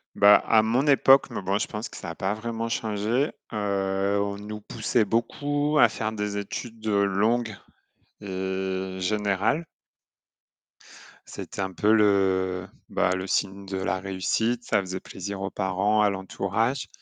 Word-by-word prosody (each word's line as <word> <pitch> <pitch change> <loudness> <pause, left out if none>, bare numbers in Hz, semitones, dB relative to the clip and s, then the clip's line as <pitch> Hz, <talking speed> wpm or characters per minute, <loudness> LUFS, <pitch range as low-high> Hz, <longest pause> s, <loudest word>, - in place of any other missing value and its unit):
Bah, 100 +1 +7
à 110 -1 +6
mon 120 +5 +1
époque 135 -1 +6
Mais - - -4
bon, 95 +2 0
je - - -2
pense 105 +2 -5
que - - -10
ça - - -7
a - - -9
pas 95 +3 -1
vraiment 115 +1 -4
changé, 110 +5 0 0.2
heu, 100 -1 0
on 100 0 -2
nous 105 +1 -7
poussait 115 +1 0
beaucoup 145 +7 0
à 120 - +7
faire 110 0 -3
des 105 -1 -3
études 110 +2 -6
longues 105 +2 +1 0.7
et 95 -1 -3
générales. 105 - 0 1.6
C'était - - -7
un 95 -1 -2
peu 105 +4 +3
le, 95 -3 +2 0.2
bah, - - +1
le 95 +1 -4
signe 100 +1 -1
de 95 0 -4
la 95 -1 -1
réussite. 100 +5 -1
Ça - - +2
faisait 95 -1 -5
plaisir 95 +1 -7
aux 95 - -2
parents, 100 +2 +1
à 105 - +4
l'entourage. 100 +6 -2
100 Hz, 150 wpm, -26 LUFS, 95-110 Hz, 1.6 s, Bah